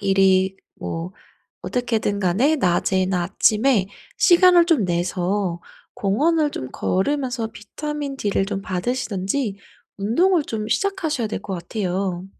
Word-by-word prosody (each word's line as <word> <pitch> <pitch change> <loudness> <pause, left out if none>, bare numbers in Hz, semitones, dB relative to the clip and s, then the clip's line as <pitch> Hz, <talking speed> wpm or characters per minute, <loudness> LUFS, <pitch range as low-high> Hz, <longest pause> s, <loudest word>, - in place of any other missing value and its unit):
일이 190 -1 +3 0.2
뭐 165 +3 -5 0.5
어떻게든 225 -5 -1
간에 220 - +2
낮에나 185 -2 +1
아침에 210 +2 +2 0.3
시간을 355 -1 +6
좀 315 - +3
내서 180 +1 -1 0.3
공원을 295 +10 +1
좀 130 - -6
걸으면서 250 +2 -1
비타민 290 +6 -6
D를 200 -5 0
좀 195 -1 -4
받으시든지 200 +2 -2 0.4
운동을 320 - +2
좀 215 -4 -4
시작하셔야 330 - -1
될 - - -4
것 195 - -4
같아요. 185 0 -3
205 Hz, 260 characters per minute, -22 LUFS, 190-275 Hz, 0.5 s, 시간을